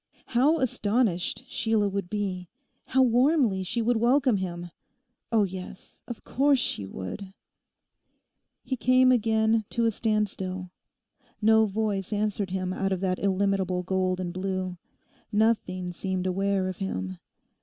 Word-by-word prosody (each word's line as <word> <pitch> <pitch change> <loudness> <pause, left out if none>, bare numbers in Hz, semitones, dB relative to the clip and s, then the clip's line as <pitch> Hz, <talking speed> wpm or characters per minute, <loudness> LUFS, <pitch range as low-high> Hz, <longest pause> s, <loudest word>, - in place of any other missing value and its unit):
How 275 +7 +3
astonished 215 - 0
Sheila 220 -2 +1
would 195 -2 -3
be; 185 -4 -3 0.4
how 265 0 +3
warmly 250 -4 +3
she 225 +5 -2
would 240 +1 +2
welcome 245 0 +3
him!... 175 -2 -5 0.6
Oh 225 -2 +4
yes, 185 -1 -8
of 240 - -7
course 280 +1 +3
she 100 - -2
would. 95 - -7 1.3
He 260 - -2
came 255 +1 +4
again 220 -1 +2
to 235 -1 0
a 225 - +3
standstill. 195 -4 -2 0.7
No 220 0 +5
voice 205 -2 -2
answered 210 -2 -1
him 185 0 -2
out 195 +1 -1
of 190 -1 -1
that 185 -1 0
illimitable 195 -2 0
gold 185 0 0
and 175 -2 -3
blue. 185 -1 -3 0.5
Nothing 205 -5 +1
seemed 185 +1 -3
aware 195 +1 0
of 185 -1 -4
him. 95 - -4
200 Hz, 135 wpm, -27 LUFS, 185-225 Hz, 1.3 s, No